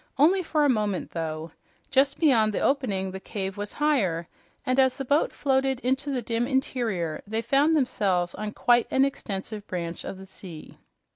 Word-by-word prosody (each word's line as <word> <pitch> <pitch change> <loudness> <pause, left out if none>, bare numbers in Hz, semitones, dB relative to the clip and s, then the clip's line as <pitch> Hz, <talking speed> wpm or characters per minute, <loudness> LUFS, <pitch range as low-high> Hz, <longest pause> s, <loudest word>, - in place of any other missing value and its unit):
Only 345 +7 +5
for 310 -3 +1
a - - +5
moment, 210 -7 0
though. 160 -1 -4 0.4
Just 275 +1 +3
beyond 225 -9 +4
the - - 0
opening 200 -9 0
the 190 - -6
cave 195 -1 -5
was 205 0 -5
higher, 200 - +1 0.4
and 255 +1 +1
as 260 -1 +3
the 270 - -4
boat 285 +4 +2
floated 265 -2 +1
into 265 +3 0
the 255 -3 -2
dim 230 +2 -1
interior 235 - -1
they 220 +2 -2
found 290 +5 +3
themselves 195 - +1
on 215 0 -5
quite 240 -1 +3
an 265 +1 +3
extensive 210 -5 -5
branch 170 -2 -4
of 195 - -6
the 190 - -10
sea. 185 -4 -11
230 Hz, 180 wpm, -26 LUFS, 190-270 Hz, 0.4 s, Only